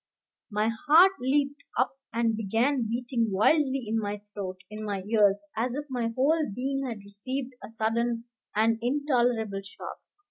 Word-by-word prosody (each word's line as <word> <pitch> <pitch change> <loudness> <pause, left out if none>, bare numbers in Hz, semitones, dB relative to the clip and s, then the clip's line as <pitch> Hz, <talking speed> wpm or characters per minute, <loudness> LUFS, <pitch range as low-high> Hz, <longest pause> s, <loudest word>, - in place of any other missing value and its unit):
My 215 +1 +1 0.2
heart 340 +6 +8
leaped 280 +2 +1 0.2
up 255 +2 +1 0.2
and 230 -1 +1
began 225 +4 +1
beating 235 -1 0
wildly 270 +6 +3
in 225 +1 +1
my 205 -1 -2 0.2
throat, 185 -2 -5
in 215 0 -6
my 200 -3 -3
ears, 205 -1 +3
as 240 +3 -1
if 290 +1 -3
my 245 -3 0
whole 300 0 +2
being 275 +1 -1
had 225 -4 -5
received 255 +6 -5
a - - -8
sudden 230 +1 0 0.3
and 225 +1 +3
intolerable 240 -6 +1
shock. 195 -1 -9
235 Hz, 150 wpm, -28 LUFS, 215-265 Hz, 0.3 s, heart